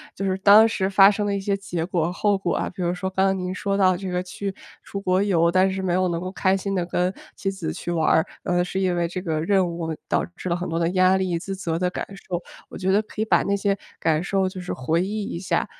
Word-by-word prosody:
就 195 - -3
是 190 0 0
当 210 +3 +7
时 195 -4 -1
发 195 0 +7
生 210 0 -1
的 205 - 0
一 - - -1
些 195 +1 0
结 175 -4 -3
果 175 -2 0
后 205 +2 +1
果 185 -3 -1
啊。 - - -1
比 185 - -8
如 175 0 0
说 190 +1 -3
刚 190 0 +1
刚 195 0 +2
您 180 0 -3
说 200 0 -1
到 185 -2 +4
这 190 +1 -5
个 180 0 -1
去 195 +2 -5 0.3
出 200 - -6
国 185 +1 +2
游， 170 -4 +3
但 185 +2 +3
是 190 - -3
没 185 -2 0
有 185 +1 +2
能 170 - -1
够 185 +2 -4
开 190 0 +2
心 195 +1 -2
地 180 -2 0
跟 180 +1 0 0.2
妻 195 - -1
子 190 - -4
去 175 - -5
玩 165 -2 +1
儿。 160 - +4 0.2
嗯， 175 0 +1
是 190 +1 -3
因 185 -2 +1
为 170 - +1
这 180 +2 -5
个 160 -4 -2
任 190 +2 +2
务 170 -2 -4
导 - - +1
致 185 - -5
了 170 - +1
很 180 +1 -4
多 165 - -2
的 170 0 +1
压 185 +1 +4
力， 185 -3 0
自 195 +3 -5
责 170 -3 -2
的 180 0 +1
感 - - -4 0.2
受。 175 -2 -2 0.3
我 - - -8
觉 190 0 0
得 200 +2 +4
可 215 0 -6
以 - - +1
把 - - +3
那 200 - +1
些 200 0 0 0.2
感 160 0 +1
受 190 0 0
就 185 -1 -8
是 180 - -4
回 160 +6 0
忆 205 +3 -2
一 170 - -5
下， 185 - 0
185 Hz, 305 characters per minute, -23 LUFS, 175-195 Hz, 0.3 s, 当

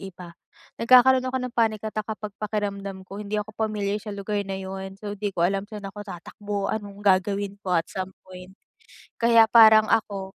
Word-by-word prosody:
iba? 180 -3 -10 0.5
Nagkakaroon 255 +2 +6
ako 255 0 -2
ng 250 -1 -5
panic 220 -2 +1
attack 215 0 -3
kapag 215 -1 -5
pakiramdam 200 -2 -4
ko 195 +2 -8
hindi 210 +1 -3
ako 210 +1 -5
pamilyar 210 -2 -2
sa 210 -2 -6
lugar 205 +1 -2
na 195 - -3
yun, 190 0 -7
so 205 -1 -5
di 205 0 -2
ko 170 - +1
alam 195 +1 -1
saan 210 -2 -8
ako 205 +1 -9
tatakbo, 200 +3 -5
anong 205 -2 -6
gagawin 200 +1 +1
ko 180 -2 -1
at 165 - 0
some 190 0 -5
point. 185 0 -12 0.7
Kaya 230 -1 +6
parang 220 -2 +8
ako, 200 -3 -1
205 Hz, 185 wpm, -25 LUFS, 195-215 Hz, 0.7 s, parang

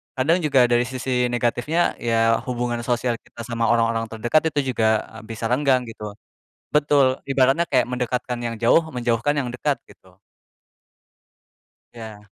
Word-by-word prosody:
kadang 145 +6 +2
juga 145 -6 +3
dari 120 0 +2
sisi 125 -1 -1
negatifnya 120 +7 0
ya 115 -1 +2
hubungan 120 -1 -2
sosial 120 -1 0
kita 120 - -13
sama 115 0 -2
orang-orang 115 0 +1
terdekat 120 +8 +1
itu 135 -3 0
juga, 110 -2 +2 0.2
eee, 115 - -11
bisa 115 +1 -4
renggang 130 -1 +2
gitu. 105 -2 -8 0.6
Betul 145 -3 +3
ibaratnya 135 +5 +2
kayak 125 -3 +2
mendekatkan 125 0 -3
yang 115 -1 -3
jauh, 120 +8 +4
menjauhkan 120 +1 0
yang 130 -4 -1
dekat, 140 +3 -1
gitu. 90 -1 -21 1.8
Iya. 110 -3 -10
120 Hz, 140 wpm, -22 LUFS, 115-135 Hz, 1.8 s, jauh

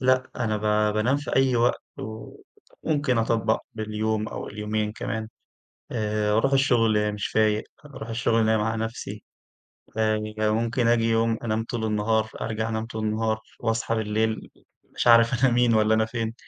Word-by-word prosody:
لأ 130 0 +2
أنا 110 -3 0
ب 105 0 +1
بانام 120 +6 +2
في 145 - -3
أي 135 -2 +3
وقت، 120 +1 +2 1.0
وممكن 145 -6 +1
أطبق 115 0 +1
باليوم 110 0 -2
أو - - -6
اليومين 105 0 -2
كمان، 110 0 -4 0.6
آآ 105 -2 0
أروح 135 +4 +2
الشغل 115 -6 +3
مش 105 -1 -3
فايق، 110 -1 +2 0.2
أروح 125 -6 -9
الشغل 115 -1 +1
نايم 110 -1 +2
على 110 +1 -1
نفسي، 115 +1 -6 0.8
آآ 110 -1 +2 0.2
ممكن 115 +3 +1
آجي 115 -1 +3
يوم 115 0 +2
أنام 110 0 -1
طول 115 -1 -4
النهار، 110 +1 +1
أرجع 110 0 -2
أنام 110 0 -2
طول 110 -1 -5
النهار 110 0 0 0.2
وأصحى 115 0 0
بالليل 110 0 -1 0.4
مش - - -2
عارف 115 +2 +5
أنا 125 - +4
مين 120 -1 +3
والّا 110 0 +4
أنا 110 - +3
فين. 115 -1 -3
110 Hz, 155 wpm, -25 LUFS, 110-115 Hz, 1.0 s, عارف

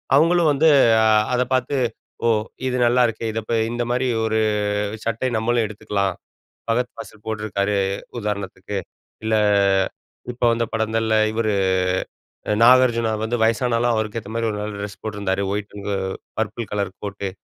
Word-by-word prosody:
அவுங்களும் 165 +1 +4
வந்து 155 +4 +3 0.7
அத 125 - +2
பார்த்து 130 +2 0 0.5
ஓ! - - +4 0.4
இது 125 - -1
நல்லாயிருக்கே! 120 -2 +2
இத 115 - -2
போய் 115 -1 +1
இந்தமாரி 120 +2 -1 0.2
ஒரு 110 0 0 0.7
சட்டை 115 +3 -1
நம்மளும் 115 +1 +1
எடுத்துக்கலாம். 100 -3 -2 0.5
பகத் 120 +2 +1
பாசில் 110 -2 -11
போட்ருக்காரு. 105 -2 -1 0.4
உதாரணத்துக்கு. 100 -2 -4 0.5
இல்ல 110 0 +1 1.0
இப்ப 120 - -7
வந்த 115 0 0
படங்கள்ல 110 0 0 0.2
இவரு, 110 -1 0 1.0
அ - - +3
நாகார்ஜுனா 120 -3 +5
வந்து 120 +1 -1
வயசானாலும் 115 +1 +2
அவருக்கேத்தமாரி 110 +1 -2
ஒரு 105 - -4
நல்ல 105 0 -4
டிரெஸ் 100 0 -7
போட்டிருந்தாரு. 100 -2 -2
ஒயிட்டுங்க 105 0 -5 0.5
பர்ப்புள் 110 0 -3
கலர் 100 -2 -1
கோட்டு, 100 -1 -4
110 Hz, 125 wpm, -22 LUFS, 105-120 Hz, 1.0 s, நாகார்ஜுனா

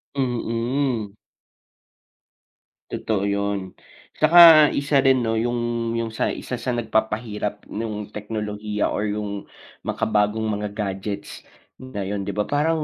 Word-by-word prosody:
Mm. 120 -2 -1 1.8
Totoo 105 -3 -1
yun, 100 -1 -1 0.5
tsaka 160 -1 +9
isa 140 0 +2
rin, 130 -2 +4
'no, 115 -1 0
yung 120 -1 -1
yung 115 -1 -2
sa 110 - -1
isa 125 - -4
sa 125 +1 -2
nagpapahirap 110 -2 -2
nung 105 -1 -4
teknolohiya 105 0 -3
or 105 - -1
yung 105 -1 -4 0.4
makabagong 105 +1 +1
mga 105 0 -4
gadgets 100 0 -4 0.4
ngayon, 100 -6 -4
'di 100 - -3
ba? 105 - +1
Parang 155 +5 0
110 Hz, 110 wpm, -23 LUFS, 105-120 Hz, 1.8 s, tsaka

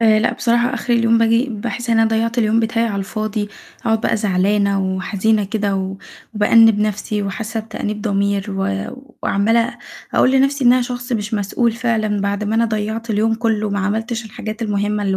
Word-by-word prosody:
آآ، 220 -1 +5
لأ 220 - +1
بصراحة 240 +1 +1
آخر 245 - -2
اليوم 230 -1 +3
باجي 230 +3 +3
باحس 235 +2 -4
إن 225 - +3
أنا 225 - +4
ضيّعت 230 +2 0
اليوم 220 0 +3
بتاعي 230 +1 0
على 210 -3 -3
الفاضي، 210 +1 -3 0.3
أقعد 225 -1 +1
بقى 225 - +1
زعلانة 200 -1 +1
وحزينة 195 +3 0
كده 205 0 -1
و 190 0 -3 0.4
وبأنِّب 225 +1 +5
نفسي 210 0 -1
وحاسة 220 +3 -3
بتأنيب 215 -1 -5
ضمير 200 -2 0
و 100 - -2 0.4
وعمّالة 225 +4 +1 0.4
أقول 255 - +4
لنفسي 275 +1 +2
إن 245 - +7
أنا 255 0 +3
شخص 245 +1 -5
مش 215 -1 -2
مسؤول 215 +3 0
فعلًا 220 -3 -1
بعد 200 +1 -1
ما 210 +1 -1
أنا 230 +1 +3
ضيّعت 220 +1 -3
اليوم 220 +1 +2
كُلّه 220 -2 -1
ما 200 - -1
عملتش 225 +4 -2
الحاجات 215 +1 -6
المهمة 205 -1 -1
اللي 195 -1 0
220 Hz, 180 wpm, -19 LUFS, 205-230 Hz, 0.4 s, إن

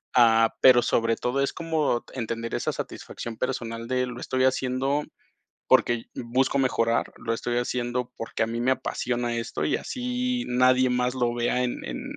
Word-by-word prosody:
Ah, 115 -2 +5
pero 125 -2 +8
sobre 115 -1 +1
todo 130 +3 -1
es 140 - +1
como 160 -7 -1
entender 115 -2 -3
esa - - -1
satisfacción 115 -2 -6
personal 115 -3 -3
de 125 0 +1
lo 120 -1 -7
estoy 130 0 0
haciendo 130 +2 +1 0.6
porque 120 -1 +3
busco 130 +3 0
mejorar, 115 -3 +1
lo 115 - -3
estoy 120 +1 -2
haciendo 120 0 -2
porque 115 - -3
a - - +2
mí 115 +1 -3
me 130 +2 +3
apasiona 120 -2 -2
esto 115 -10 -3
y 75 - +1
así 250 0 -2
nadie 125 +1 +4
más 125 0 +1
lo 120 -2 +1
vea 120 +1 0
en 125 -1 -2
en - - -5
125 Hz, 170 wpm, -26 LUFS, 115-130 Hz, 0.6 s, pero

